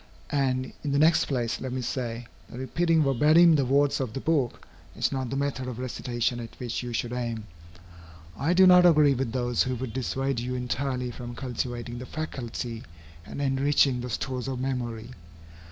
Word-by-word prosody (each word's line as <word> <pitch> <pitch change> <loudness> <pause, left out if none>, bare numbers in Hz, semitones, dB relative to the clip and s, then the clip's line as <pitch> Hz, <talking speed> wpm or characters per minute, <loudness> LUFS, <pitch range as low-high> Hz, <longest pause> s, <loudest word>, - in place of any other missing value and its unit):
And, 130 -2 0
in 145 -2 -1
the - - +2
next 160 +3 +4
place, 120 -4 -2
let 130 - -4
me 130 0 -2
say, 120 -1 -3 0.2
that - - -9
repeating 160 +5 +1
verbatim 155 +5 +5
the 140 -3 +2
words 140 +2 +2
of 130 -5 -3
the 135 - -3
book, 140 -5 0 0.3
is - - 0
not 130 -2 -2
the 135 - -3
method 135 -2 -2
of 125 -3 -5
recitation 120 -1 -2
at 115 -1 -9
which 120 -2 -3
you 120 -1 -5
should 120 +1 -2
aim. 120 -3 -3 0.9
I 160 +6 +1
do 190 +1 +7
not 180 -1 +8
agree 150 -5 +6
with 130 -2 -2
those 120 -1 0
who 130 -1 0
would 125 -2 -5
dissuade 135 0 -1
you 125 +1 -3
entirely 125 0 -2
from 120 0 -8
cultivating 120 -1 -4
the 125 - -8
faculty 120 -6 -5 0.5
and - - -7
enriching 135 -1 +2
the 125 - -5
stores 125 +2 -3
of 130 -2 -3
memory. 120 -3 -3
130 Hz, 185 wpm, -27 LUFS, 120-140 Hz, 0.9 s, not